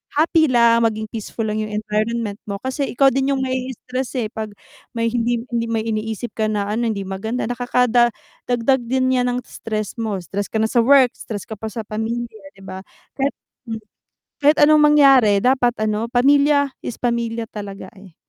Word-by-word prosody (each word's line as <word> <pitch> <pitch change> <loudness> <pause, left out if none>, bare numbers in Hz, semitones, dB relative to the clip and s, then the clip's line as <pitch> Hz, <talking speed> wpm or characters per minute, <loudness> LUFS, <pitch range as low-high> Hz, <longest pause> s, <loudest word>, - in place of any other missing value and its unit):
happy 315 +1 +3
lang 235 -2 +4
maging 220 -1 -1
peaceful 225 0 -5
lang 215 0 -2
yung 215 -1 -4
environment 215 0 -2
mo 200 - -3
kasi 265 +2 -2
ikaw 270 +2 +3
din 270 +2 +1
yung 265 - -1
ma-i-i-stress 255 0 -4
eh, 235 -4 -1
pag 220 -1 -4 0.5
may 230 0 0
hindi 235 -1 0
hindi 230 -1 -1
may 225 -1 -1
iniisip 220 +1 -3
ka 220 -1 -1
na 205 -1 -1
ano 235 +2 0
hindi 200 -3 -2
maganda 195 +6 -4
nakada 245 0 +2 0.4
dagdag 245 +2 +2
din 260 +1 +1
niyan 250 -1 +2
ng 245 0 -1
stress 215 +1 -5
mo 220 -3 -2
stress 200 +3 -4
ka - - -12
na 220 0 +1
sa 240 - +3
work, 260 +1 +5
stress 205 -3 -7
ka 220 -3 -9
pa 220 - -4
sa 225 0 -5
pamilya, 225 +1 -4 0.2
'di 195 - -16
ba 190 0 -7 0.3
kahit 275 +1 -2 0.3
hmm 220 -1 -5 0.6
kahit 295 +2 +5
anong 300 0 +6
mangyari 270 -9 +6
dapat 250 +1 +3
ano 215 +2 -1
pamilya 285 +3 +4 0.2
is 240 - -6
pamilya 235 -2 -1
talaga, 200 -3 -8
eh. 190 -4 -15
230 Hz, 185 wpm, -20 LUFS, 215-255 Hz, 0.6 s, anong